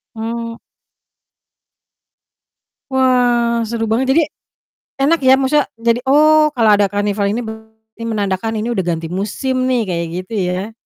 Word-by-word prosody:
Mmm. 230 +1 -5 2.3
Wah, 245 -3 +2
seru 225 -1 -2
banget. 240 +4 0
Jadi, 325 - +5 0.8
enak 310 +4 +3
ya, 260 0 +5
maksudnya 275 +2 +1
jadi, 230 +1 +1
"Oh 305 +2 +5
kalau 225 -2 +4
ada 205 -1 +3
karnaval 205 0 -1
ini 230 +4 -2
berarti 220 0 -12
menandakan 205 0 -2
ini 220 +3 -2
udah 230 - -1
ganti 165 -1 -2
musim 255 +7 -2
nih." 250 -2 +1
Kayak 170 -3 -3 0.2
gitu 225 - -15 0.2
ya. 190 +5 -3
230 Hz, 135 wpm, -17 LUFS, 210-255 Hz, 2.3 s, Jadi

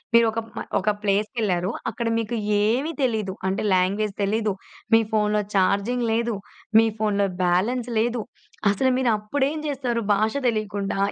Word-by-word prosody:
మీరు 235 0 +7
ఒక 220 - -5 0.2
మ - - -3 0.2
ఒక 200 +2 +1
ప్లేస్‌కెళ్లారు 200 -2 0 0.2
అక్కడ 235 - -4
మీకు 230 +1 -2 0.3
ఏమి 255 +10 +1
తెలీదు 215 -7 0
అంటే 190 - -1
లాంగ్వేజ్ 195 +3 +1
తెలీదు, 210 +1 +1 0.4
మీ 225 - +7
ఫోన్‌లో 210 -1 +2
చార్జింగ్ 200 +6 +2
లేదు, 230 0 0 0.4
మీ 225 - +6
ఫోన్‌లో 205 -2 +1 0.2
బ్యాలెన్స్ 225 +8 +1
లేదు 235 0 0 0.5
అసలు 260 +6 +2
మీరు 255 -2 +2
అప్పుడేం 275 +8 -1
జేస్తారు? 255 -5 -1
భాష 215 +2 +1 0.2
తెలియకుండా 205 -3 -2
215 Hz, 140 wpm, -24 LUFS, 200-235 Hz, 0.5 s, మీరు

